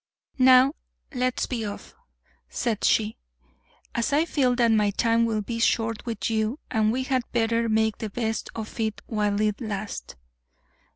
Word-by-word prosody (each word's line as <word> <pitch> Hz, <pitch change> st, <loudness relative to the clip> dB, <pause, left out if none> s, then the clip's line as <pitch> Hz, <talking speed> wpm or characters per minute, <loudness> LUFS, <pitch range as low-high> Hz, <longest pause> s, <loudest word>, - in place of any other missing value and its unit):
"Now, 260 Hz, +2 st, +6 dB, 0.4 s
let's 255 Hz, -1 st, 0 dB
be 235 Hz, -3 st, -3 dB
off," 205 Hz, -1 st, -7 dB, 0.6 s
said 225 Hz, -4 st, -2 dB
she, 220 Hz, 0 st, +2 dB, 0.8 s
"as 235 Hz, +5 st, -1 dB
I 300 Hz, +3 st, +3 dB
feel 260 Hz, -6 st, +1 dB
that 235 Hz, -2 st, +3 dB
my 210 Hz, -2 st, +3 dB
time 230 Hz, +3 st, +2 dB
will 215 Hz, -2 st, -1 dB
be 230 Hz, +2 st, -4 dB
short 225 Hz, 0 st, 0 dB
with 225 Hz, -3 st, -2 dB
you 220 Hz, +3 st, 0 dB
and 220 Hz, -2 st, +2 dB
we 260 Hz, +3 st, -1 dB
had 260 Hz, -1 st, +1 dB
better 230 Hz, 0 st, +1 dB
make 220 Hz, -1 st, +1 dB
the 220 Hz, -, -4 dB
best 225 Hz, +1 st, -3 dB
of 220 Hz, +1 st, -7 dB
it 220 Hz, -2 st, -2 dB
while 210 Hz, -2 st, 0 dB
it 210 Hz, +2 st, 0 dB
lasts." 210 Hz, -, -5 dB
225 Hz, 160 wpm, -25 LUFS, 215-245 Hz, 0.8 s, Now